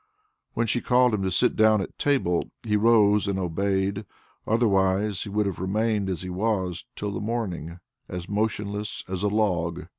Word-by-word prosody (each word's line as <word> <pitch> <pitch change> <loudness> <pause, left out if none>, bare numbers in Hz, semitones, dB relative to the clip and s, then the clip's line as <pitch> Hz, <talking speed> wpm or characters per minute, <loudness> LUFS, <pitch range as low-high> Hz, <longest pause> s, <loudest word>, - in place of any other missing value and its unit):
When 115 - +1
she 120 +2 0
called 125 -1 +3
him 105 - 0
to 95 - 0
sit 95 - +2
down 110 0 +4
at 95 - -6
table, 130 -12 +1
he 105 -2 0
rose 105 -2 +4
and 100 -1 -1
obeyed, 95 +3 -1 0.4
otherwise 100 -3 +2
he - - -6
would 105 +1 0
have 100 -3 -3
remained 105 +1 0
as 90 -1 -3
he 90 - -5
was 95 -2 -1
till 105 0 -3
the - - -4
morning, 95 -7 -4 0.3
as 90 -1 -6
motionless 105 0 -2
as 95 -1 -4
a 105 - +2
log. 90 -5 0
100 Hz, 175 wpm, -25 LUFS, 95-110 Hz, 0.4 s, down